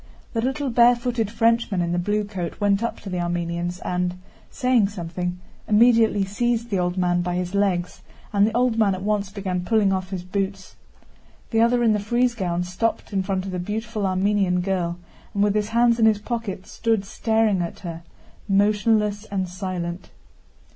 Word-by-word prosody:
The 225 - 0
little 265 +2 -1
barefooted 240 -1 +3
Frenchman 230 -3 +1
in 170 -1 0
the 175 - 0
blue 210 +4 0
coat 190 -5 -5
went 205 0 +2
up 230 - -2
to 200 - -7
the 180 - -2
Armenians 175 0 -2
and, 180 0 -1 0.3
saying 250 -5 +2
something, 180 -1 -4 0.3
immediately 220 -2 +4
seized 235 +3 -1
the 195 - +1
old 180 +1 -1
man 175 -1 +2
by 175 0 -2
his 180 +1 -3
legs 190 -3 0 0.3
and 200 0 +4
the 225 +1 -1
old 245 -2 +2
man 200 -3 +3
at 185 - -7
once 205 -1 0
began 190 -3 -3
pulling 205 0 +2
off 185 -1 -2
his 185 -2 -4
boots. 195 0 -4 0.8
The 225 -1 +3
other 240 +1 +3
in 225 -2 +4
the 210 - +1
frieze 240 +4 +1
gown 180 -5 -1
stopped 190 +5 -2
in 195 - +1
front 190 -1 -2
of 195 - -5
the 180 - -3
beautiful 215 +2 -3
Armenian 190 -1 +1
girl 175 -2 -1 0.4
and 200 - +2
with 205 -1 +2
his 210 0 0
hands 235 0 +3
in 220 - +6
his 215 -2 +4
pockets 210 -3 -5
stood 225 -3 0
staring 220 -2 +1
at 170 - -5
her, 170 -3 -6 0.5
motionless 210 +1 +2
and 190 -3 -2
silent. 180 -1 -5
200 Hz, 180 wpm, -23 LUFS, 180-225 Hz, 0.8 s, in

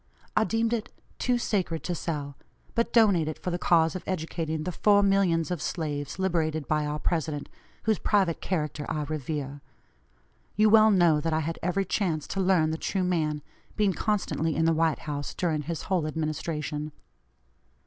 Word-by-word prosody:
I 220 - +4
deemed 225 +1 0
it 235 0 -2 0.3
too 250 -1 +2
sacred 185 -8 -1
to 180 - -2
sell, 145 -4 -4 0.4
but 235 - 0
donate 200 -9 +4
it 155 - -3
for 180 - -4
the 175 - -2
cause 165 -2 +3
of 185 - -5
educating 160 -3 -2
the 180 - -2
four 205 +3 +4
millions 185 -4 +2
of 175 -4 -2
slaves 150 -4 -3
liberated 160 -5 0
by 150 -1 +1
our 150 0 -2
President, 155 -2 -2 0.4
whose 220 -2 +1
private 190 -6 +1
character 150 -4 -2
I 150 - -1
revere. 145 -1 -4 0.9
You 215 0 +4
well 220 0 +7
know 175 -6 +4
that 165 +1 -1
I 155 - +1
had 165 +2 -4
every 180 +3 0
chance 170 -6 -1
to 195 - -3
learn 180 -4 +3
the 160 - -3
true 190 -2 -1
man, 155 -5 0 0.3
being 205 -3 +2
constantly 175 -6 -1
in 160 - +2
the 165 - +4
White 160 -1 +1
House 145 -2 -4
during 160 -4 0
his 160 +1 -4
whole 180 -5 0
administration. 155 -1 -3
165 Hz, 175 wpm, -27 LUFS, 155-190 Hz, 0.9 s, well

